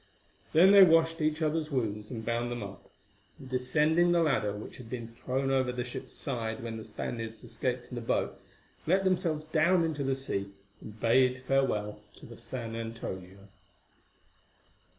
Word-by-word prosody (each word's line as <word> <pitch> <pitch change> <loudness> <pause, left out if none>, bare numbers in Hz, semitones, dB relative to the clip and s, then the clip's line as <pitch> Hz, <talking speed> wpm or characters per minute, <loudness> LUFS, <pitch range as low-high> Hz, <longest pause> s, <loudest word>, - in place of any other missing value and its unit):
Then 180 +5 +7
they 200 -1 +9
washed 165 -2 +5
each 155 +1 +1
other's 155 0 0
wounds 105 -6 -2
and 115 -3 -6
bound 120 +1 -1
them 120 -2 -4
up, 100 -1 -10 0.5
and 135 - -11
descending 150 +7 +2
the 170 -1 +4
ladder 130 -9 +1
which 105 - -8
had 120 -3 -11
been 120 -2 -5
thrown 130 +3 -2
over 130 -2 +2
the 125 0 -3
ship's 125 +1 -7
side 115 -4 -3
when 115 -1 -4
the 110 - -7
Spaniards 115 +1 -6
escaped 120 +1 -3
in - - -10
the 120 - -4
boat, 115 - 0 0.5
let 190 +4 +3
themselves 175 -5 0
down 165 +3 +3
into 155 -3 -1
the 135 0 +1
sea 100 -7 -3 0.3
and 105 0 -11
bade 130 +3 +3
farewell 105 -7 +1 0.2
to - - -13
the 115 - -11
San 115 -1 -6
Antonio. 100 -4 -7
125 Hz, 170 wpm, -30 LUFS, 115-155 Hz, 0.5 s, they